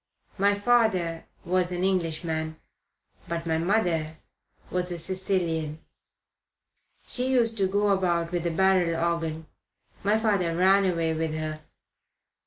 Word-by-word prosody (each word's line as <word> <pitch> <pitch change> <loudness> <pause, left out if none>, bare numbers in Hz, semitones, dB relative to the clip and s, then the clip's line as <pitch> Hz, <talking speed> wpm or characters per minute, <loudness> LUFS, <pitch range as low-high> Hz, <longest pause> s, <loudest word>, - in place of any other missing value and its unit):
My 200 +1 +4
father 205 -7 +1 0.2
was 180 0 +1
an 180 0 -2
Englishman; 160 -3 -1 0.7
but 170 0 -3
my 160 -1 0
mother 165 -4 0 0.5
was 180 0 -1
a 175 - -3
Sicilian. 170 -4 -2 1.3
She 255 +1 -1
used 235 -3 +2
to 190 - +3
go 205 +2 +1
about 175 -4 +1
with 175 -1 -1
a - - +1
barrel 180 -1 +2
organ 165 -1 -1 0.6
my 205 +2 +3
father 200 -7 +1
ran 195 +2 +5
away 165 -3 +1
with 160 -1 -2
her. 155 0 -4
175 Hz, 125 wpm, -26 LUFS, 165-195 Hz, 1.3 s, ran